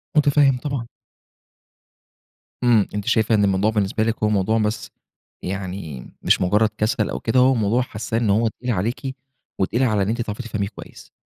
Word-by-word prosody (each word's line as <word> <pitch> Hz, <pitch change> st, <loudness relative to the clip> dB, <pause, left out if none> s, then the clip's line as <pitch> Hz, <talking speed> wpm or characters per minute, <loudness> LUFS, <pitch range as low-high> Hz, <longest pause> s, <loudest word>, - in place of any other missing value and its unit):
مُتفهِّم 145 Hz, -2 st, +4 dB
طبعًا. 135 Hz, -3 st, -4 dB, 1.8 s
امم، 115 Hz, -5 st, +4 dB
أنتِ 105 Hz, -, -3 dB
شايفة 110 Hz, -2 st, +3 dB
إن 105 Hz, -, +3 dB
الموضوع 100 Hz, +2 st, +2 dB
بالنسبة 105 Hz, 0 st, 0 dB
لِك 115 Hz, 0 st, 0 dB
هو 105 Hz, -, +3 dB
موضوع 105 Hz, +1 st, +1 dB
بس 110 Hz, +1 st, -2 dB, 0.5 s
يعني، 90 Hz, -8 st, -5 dB
مش -, -, +3 dB
مجرد 105 Hz, +4 st, +3 dB
كسل 110 Hz, +2 st, 0 dB
أو -, -, -3 dB
كده، 120 Hz, +3 st, +1 dB
هو 130 Hz, +1 st, +5 dB
موضوع 115 Hz, +3 st, +1 dB
حاسَّاه 110 Hz, -2 st, -4 dB
إن 115 Hz, -3 st, 0 dB
هو 110 Hz, +3 st, +3 dB
تقيل 120 Hz, +3 st, -4 dB
عليكِ، 120 Hz, +7 st, -2 dB, 0.4 s
وتقيل 115 Hz, +7 st, +1 dB
على 105 Hz, -5 st, +2 dB
إن 100 Hz, -, -2 dB
أنتِ 120 Hz, +1 st, -1 dB
تعرفي 110 Hz, +2 st, -4 dB
تفهَميه 105 Hz, -4 st, -3 dB
كويس. 100 Hz, -, -13 dB
110 Hz, 170 wpm, -22 LUFS, 100-120 Hz, 1.8 s, هو